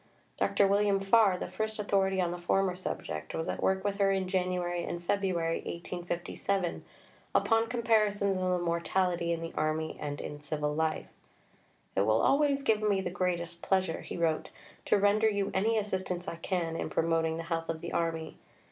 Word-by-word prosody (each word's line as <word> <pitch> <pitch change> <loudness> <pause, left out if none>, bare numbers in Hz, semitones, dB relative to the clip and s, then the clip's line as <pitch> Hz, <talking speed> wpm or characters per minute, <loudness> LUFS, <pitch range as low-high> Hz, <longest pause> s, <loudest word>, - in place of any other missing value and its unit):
Dr. 200 - +3
William 200 0 +3
Farr, 195 -1 +4
the - - -4
first 220 0 -3
authority 195 -2 +1
on 175 -2 +1
the 175 - -5
former 185 +1 +1
subject, 80 - -5
was 160 - -2
at - - -3
work 190 0 +1
with 200 -1 -1
her 200 -1 +4
in 190 -1 +1
January 180 -2 -1
and 175 - -4
February 175 -2 0
1857 175 +2 -3 0.5
upon 225 0 +3
comparisons 215 -4 +2
of 185 - -2
the 180 - +2
mortality 170 0 0
in 165 -1 -1
the 165 0 -5
army 155 +1 -1
and 145 -1 -4
in 145 0 -6
civil 150 0 -2
life. 160 +1 0 0.9
"It - - +3
will 110 +2 +3
always 280 -1 +3
give 220 -5 +2
me 205 -2 +2
the 180 - -3
greatest 175 -1 -2
pleasure," 185 -4 0
he - - -6
wrote, 165 -2 0 0.4
"to - - +4
render 205 +2 +4
you 200 -2 -1
any 220 +4 +2
assistance 190 -3 -2
I 165 - -4
can 170 -1 -2
in - - -3
promoting 165 -1 +1
the 165 - -4
health 165 0 -3
of 160 -1 -3
the 170 - -5
Army. 165 -1 -2
180 Hz, 180 wpm, -30 LUFS, 165-200 Hz, 0.9 s, Farr